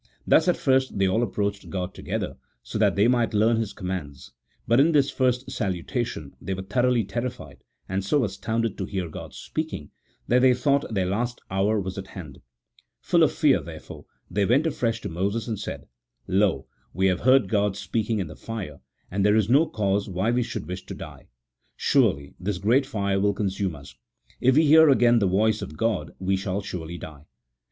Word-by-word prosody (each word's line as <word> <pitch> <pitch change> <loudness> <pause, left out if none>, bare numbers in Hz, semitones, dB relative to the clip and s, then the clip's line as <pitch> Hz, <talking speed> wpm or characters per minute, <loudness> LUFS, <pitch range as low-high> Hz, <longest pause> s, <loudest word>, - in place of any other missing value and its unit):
Thus - - +4
at - - +3
first 130 -3 +1
they 100 - +3
all 110 +5 +1
approached 100 -2 -2
God 95 -1 -4
together, - - -4 0.3
so - - -5
that - - +3
they 100 +3 +4
might 120 -3 +1
learn 110 +2 +3
His 110 -2 -2
commands, 90 -7 -6 0.4
but 115 +3 +4
in 160 +4 +4
this 140 -2 +3
first 125 0 0
salutation, 95 - -3
they 95 - -3
were 95 - -6
so - - -19
thoroughly 125 +1 +2
terrified 120 +6 -5 0.3
and 95 0 -2
so 130 +8 +2
astounded 115 +1 -2
to 95 - -1
hear 95 -2 -3
God - - -9
speaking, 155 - -5 0.4
that 125 - +4
they 130 -1 +5
thought 140 +2 +1
their 95 -4 0
last 120 +6 -2
hour 100 +3 +1
was 95 0 -4
at 95 - -8
hand: 75 -8 -10 0.6
full - - +2
of - - +5
fear, - - +3
therefore, - - -10 0.2
they 100 - 0
went 130 +10 +3
afresh 115 -7 -1
to - - -4
Moses, 100 +7 -2
and 110 -4 -3
said, 105 - -6 0.3
" - - -55
Lo, 95 -8 +1 0.3
we 95 +2 +1
have 90 -3 +2
heard 130 -4 +4
God 100 -1 +1
speaking 110 +3 -1
in 95 - -1
the 80 -1 -10
fire, 100 -11 -7 0.3
and 100 +2 0
there 105 +1 +4
is 110 -1 +2
no 150 +5 +5
cause 100 -1 -1
why 95 +5 0
we 125 +1 +2
should 120 - -4
wish 90 +1 -5
to - - -6
die: - - -10 0.5
surely 70 0 +2
this 95 +1 -2
great 120 +8 +2
fire 100 -6 -1
will 100 +1 +2
consume 95 -4 -2
us: 70 -1 -12 0.5
if 130 +1 +3
we 155 +2 +5
hear 160 +1 +7
again 120 -3 +5
the 100 - +2
voice 105 +4 +2
of 75 - -7
God, 115 -4 0
we 95 +1 0
shall 95 0 -2
surely 85 -3 -6
die. 75 -3 -11
105 Hz, 200 wpm, -25 LUFS, 95-120 Hz, 0.6 s, hear